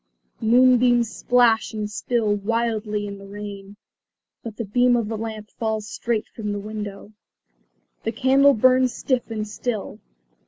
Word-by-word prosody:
Moonbeams 245 0 +4
splash 240 -3 +3
and 210 -1 -2
spill 220 -1 0
wildly 215 0 -1
in 200 -1 -7
the 195 - -12
rain. 200 0 -8 0.7
But 225 -2 -8
the 230 - -3
beam 245 +4 +3
of 230 -3 -1
the 225 - -3
lamp 215 -1 -6
falls 220 -2 -3
straight 225 0 -2
from 210 -2 -5
the 205 - -3
window. 205 -1 -7 0.9
The 225 - -2
candle 270 +4 +4
burns 255 +2 +4
stiff 255 -3 -1
and 215 -1 -4
still. 215 0 -4
220 Hz, 145 wpm, -23 LUFS, 210-240 Hz, 0.9 s, Moonbeams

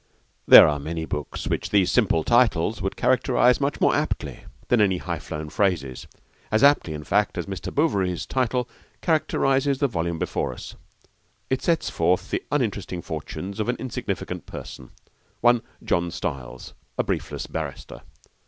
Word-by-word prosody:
There - - +11
are 75 -1 0
many 80 +2 -4
books 75 -2 -5
which - - -2
these 100 -3 +3
simple 80 - +2
titles 115 -4 +2
would 95 0 -2
characterise 125 0 +3
much 140 +1 -1
more - - +3
aptly - - -3 0.2
than 120 -3 +3
any 95 -3 +3
high 85 -3 -4
flown 75 0 -6
phrases 80 -9 -1 0.4
as 110 0 +2
aptly, 140 - +4
in 75 - -7
fact, 105 +6 +1
as - - -2
Mr. 95 -1 -6
Bouverie's 95 - 0
title 125 -1 -1 0.3
characterises 140 -4 +1
the 140 - +2
volume 85 -7 -2
before - - -2
us. - - -10 0.8
It 130 - +1
sets 165 -2 0
forth 90 +3 0
the - - -1
uninteresting 100 - -2
fortunes 90 +6 -6
of 110 - -1
an 125 - +1
insignificant 130 -2 -5
person, 65 - -9 0.5
one 120 0 +4 0.2
John 85 0 0
Stiles, 65 -6 -6 0.2
a - - +2
briefless - - -3
barrister. - - -6
100 Hz, 155 wpm, -24 LUFS, 80-125 Hz, 0.8 s, There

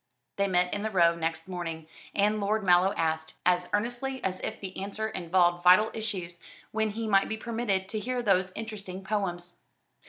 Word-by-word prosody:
They 200 0 +2
met 180 -1 +2
in 205 - -2
the 220 - -1
Row 170 -4 +4
next 165 +1 -3
morning, 165 -3 -5 0.3
and 210 +1 +2
Lord 210 +1 0
Mallow 180 +1 +5
asked 160 -1 -1
as 180 0 +2
earnestly 245 +5 -1
as 185 -1 -2
if - - -4
the 190 -2 -7
answer 205 +3 -3
involved 175 -1 +1
vital 185 +5 +6
issues 185 -6 -4 0.3
when 220 0 0
he 220 +2 -4
might 195 -2 +3
be 220 - -2
permitted 220 -4 -1
to 215 - -2
hear 245 +3 -2
those 190 -3 +2
interesting 200 -4 -6
poems. 180 -4 -3
190 Hz, 180 wpm, -28 LUFS, 180-215 Hz, 0.3 s, vital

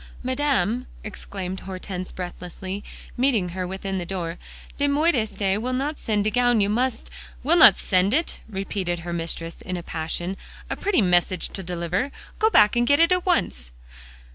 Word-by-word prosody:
"Madame," 255 -4 0 0.2
exclaimed 190 -3 -5
Hortense 185 -1 -6
breathlessly, 185 +2 -6 0.3
meeting 240 -8 +2
her 180 +1 -3
within 190 +1 -3
the - - -3
door, 175 -3 -4 0.4
"de 285 - +3
modiste 230 - +1
will 255 +2 -2
not 285 +4 -2
send 210 -2 0
de 215 - +1
gown; 245 0 +3
you 200 0 +2
must" 235 - -1 0.3
"Will - - +4
not - - +9
send 185 +2 +2
it?" 320 +7 0
repeated 190 -3 -3
her 175 +1 -5
mistress 165 0 -4
in 185 -1 -4
a 175 - -6
passion. 175 +4 -3 0.3
"A - - 0
pretty 385 - +2
message 180 0 +2
to 195 - -3
deliver. 180 +8 -2 0.3
Go 440 - +4
back 210 - +5
and 240 0 +2
get 285 +3 +4
it 335 +2 +5
at 365 0 +1
once." 65 - 0
195 Hz, 165 wpm, -24 LUFS, 180-250 Hz, 0.4 s, not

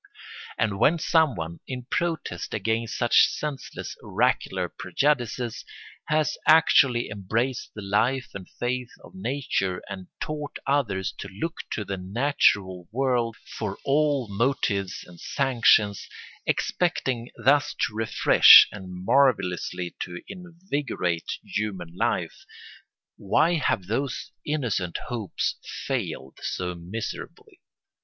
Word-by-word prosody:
And 100 -3 0
when 170 - +4
someone, 125 - +1
in 125 -2 -5
protest 165 - -2
against 110 +2 -1
such 120 - +5
senseless 150 -3 -5
oracular - - 0
prejudices, 125 -4 -1 0.4
has 155 0 0
actually 135 -6 +5
embraced 110 +6 -2
the 105 - -7
life 120 +6 +1
and 95 -2 -8
faith 125 0 -3
of - - -14
nature 95 -4 -2
and 95 -2 -7
taught 150 -1 -4
others 115 -10 0
to - - -5
look 110 - -5 0.2
to 105 - -3
the 100 -1 -4
natural 95 -3 +1
world 120 -2 0
for 105 -3 -5
all 145 -3 +2
motives 100 -3 -1
and 90 -1 -15
sanctions, 115 -6 +2 0.4
expecting 130 -9 0
thus 140 +1 +3
to - - -6
refresh 110 +1 +8
and 95 -3 -9
marvellously 90 - +1
to 90 -1 -5
invigorate 165 - -3
human 95 -6 -4
life, - - -1 0.7
why 155 - +2
have 135 - 0
those 125 +6 -3
innocent 120 - -1
hopes 110 -7 -2 0.3
failed 65 0 -4
so 90 -1 -3
miserably? 90 +6 -7
115 Hz, 110 wpm, -25 LUFS, 95-140 Hz, 0.7 s, refresh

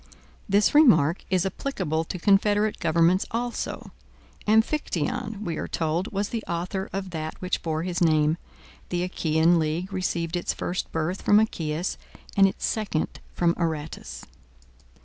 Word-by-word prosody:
This 205 +2 +4
remark 175 - +5
is 185 -1 +2
applicable 165 - -2
to 180 - -5
confederate 205 +3 +3
governments 170 +3 +3
also. 240 +1 -4 0.6
Amphictyon, 220 - 0
we 170 -4 -3
are - - -3
told, 165 +4 -1
was 200 +1 -1
the 230 -2 -3
author 180 +3 -3
of 195 -1 -4
that 155 -1 -5
which 185 0 -2
bore 160 -1 -2
his 180 -1 -3
name. 155 -1 +3 0.5
The 175 0 -1
Achaean 165 -1 +2
league 165 +5 -2
received 175 -2 -1
its 175 - -1
first 180 - -3
birth 165 +4 -2
from 205 - +5
Achaeus, 170 -5 -1 0.4
and 195 -1 +6
its 190 - -3
second 210 -8 -2 0.2
from 170 -1 +3
Aratus. 150 - -4
175 Hz, 140 wpm, -26 LUFS, 160-200 Hz, 0.6 s, and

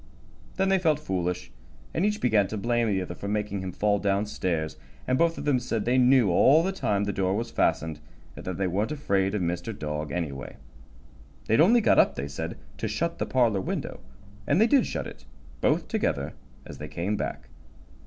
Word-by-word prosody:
Then 190 0 +2
they 195 0 +3
felt 160 -5 +2
foolish, 90 - -3 0.4
and 165 - 0
each 210 +1 +1
began 110 -5 +3
to 110 - -5
blame 120 +2 +1
the 95 -3 0
other - - -6
for 100 - -7
making 105 -1 -2
him 95 0 -4
fall 105 +2 +1
down 100 +1 +1
stairs, 85 -6 -2 0.3
and 130 - +1
both 165 +4 +2
of - - -5
them 140 -4 +3
said 115 -3 -2
they 125 +2 +3
knew 125 -5 +5
all 140 - +5
the 190 - 0
time 105 - 0
the 100 0 -2
door 95 0 0
was 115 +2 -3
fastened, 80 -7 0 0.4
and - - -9
that 90 -2 -4
they 95 - 0
weren't 100 - -1
afraid 100 -9 0
of 100 - 0
Mr. 85 +5 -3
Dog, 75 -1 -4
anyway. 75 -6 -4 0.9
They'd 110 +6 +3
only 230 +8 +6
got - - +4
up, - - +4
they 70 - -4
said, 70 - -5 0.2
to - - -1
shut 170 +1 -2
the - - -1
parlor 115 -7 +2
window, - - -4 0.5
and 145 - +3
they 220 - +6
did 255 +1 +3
shut - - -3
it, - - -10 0.4
both - - +2
together, 70 0 -1 0.3
as - - -10
they 75 - -6
came 85 +7 -2
back. - - -5
105 Hz, 205 wpm, -27 LUFS, 90-130 Hz, 0.9 s, only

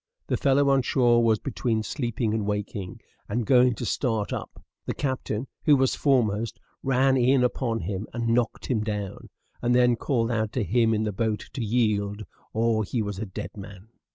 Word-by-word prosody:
The - - 0
fellow 140 0 +3
on 135 -1 +4
shore 120 -2 +3
was 110 -1 +4
between 115 -2 -2
sleeping 120 -3 -2
and 110 -1 0
waking, 105 -2 -4 0.3
and 115 +3 -1
going 125 0 +5
to - - -5
start 110 -6 -1
up; - - -6 0.3
the - - -2
captain, 130 -4 -2 0.2
who 150 - +7
was 130 -1 +2
foremost, 115 -4 +1 0.2
ran 135 0 +3
in 130 +1 +4
upon 120 -2 0
him, 95 +4 -4
and 115 0 -2
knocked 120 -1 0
him 125 -4 0
down; 105 -3 -5 0.3
and 120 0 +2
then 125 -1 +4
called 115 -1 0
out 110 -1 -1
to 125 - 0
him 115 +3 +2
in 110 - 0
the 105 - -1
boat 110 +1 -2
to 130 - -3
yield, 105 -2 0 0.3
or 110 0 +1
he 110 +2 -2
was 100 -2 -5
a 110 - -4
dead 105 +3 -7
man. 100 0 -11
115 Hz, 185 wpm, -26 LUFS, 105-125 Hz, 0.3 s, who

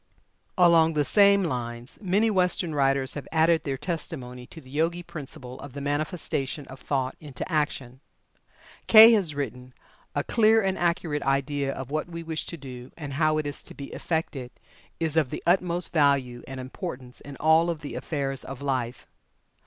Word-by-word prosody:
Along 165 -3 +5
the 145 -1 +2
same 200 +1 +5
lines, 120 -5 -4
many 205 +3 +2
Western 180 -3 +3
writers 135 -2 +1
have 145 - -7
added 160 0 +3
their 135 -2 -2
testimony 130 -5 -5
to 165 - -12
the 130 -4 -15
Yogi 165 +4 0
principle 135 -6 -7
of 140 -3 -10
the 140 - -6
manifestation 145 -1 -2
of 130 0 -10
thought 130 -2 -2
into 145 -5 -7
action. 145 -6 -2 0.9
Kay 225 +1 +10
has 190 -10 +2
written: 125 -3 -5 0.4
"A 145 - 0
clear 225 +2 +4
and 190 -3 0
accurate 170 -4 0
idea 140 0 0
of 135 0 -7
what 155 +3 -2
we 170 -1 -6
wish 160 -1 -4
to 170 - -6
do, 125 -3 -9
and 145 -4 -6
how 155 +2 +2
it 155 - -1
is 145 - 0
to - - -9
be 140 - -8
effected, 155 -6 -3 0.5
is 160 -2 0
of 155 -5 +2
the - - -6
utmost 175 0 +1
value 140 -6 +2
and 135 0 -7
importance 130 -2 -7
in 140 -1 -10
all 160 +3 +4
the 150 -2 -8
affairs 135 -3 -3
of 135 -1 -8
life. 130 -3 -2
150 Hz, 170 wpm, -26 LUFS, 135-170 Hz, 0.9 s, Kay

